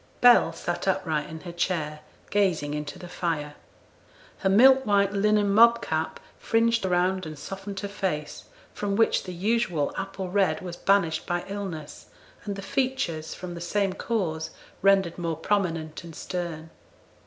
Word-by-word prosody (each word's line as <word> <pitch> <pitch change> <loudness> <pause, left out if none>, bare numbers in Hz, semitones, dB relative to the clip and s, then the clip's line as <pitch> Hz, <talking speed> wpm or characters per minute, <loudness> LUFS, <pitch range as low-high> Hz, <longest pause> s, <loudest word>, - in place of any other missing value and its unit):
Bell 245 -8 +7
sat 175 +3 -4
upright 165 -6 0
in 160 0 -8
her 175 - -7
chair, 165 -3 -2 0.3
gazing 175 -8 +1
into 150 +3 -5
the 180 -1 -9
fire. 160 -4 -2 0.9
Her 190 - +1
milk 260 +7 +7
white 200 -3 +2
linen 205 0 +2
mob 235 +2 +7
cap 160 0 -2 0.2
fringed 230 0 +2
round 185 0 +1
and 155 -1 -8
softened 195 +6 -6
her 200 - -3
face, 150 -7 -3 0.3
from 200 -1 -2
which 225 +1 +2
the 185 - -5
usual 180 -5 0
apple 195 -1 -4
red 195 -1 +2
was 175 -2 -6
banished 170 -5 +1
by 175 0 -1
illness, 185 -7 -6 0.4
and 200 -1 -3
the 195 - -7
features, 255 - -1
from 180 -1 -7
the 170 - -7
same 195 +2 0
cause, 165 -7 -2 0.3
rendered 195 -3 +3
more 165 -2 -2
prominent 165 -4 -1
and 165 -2 -10
stern. 165 -3 -5
185 Hz, 155 wpm, -26 LUFS, 160-200 Hz, 0.9 s, Bell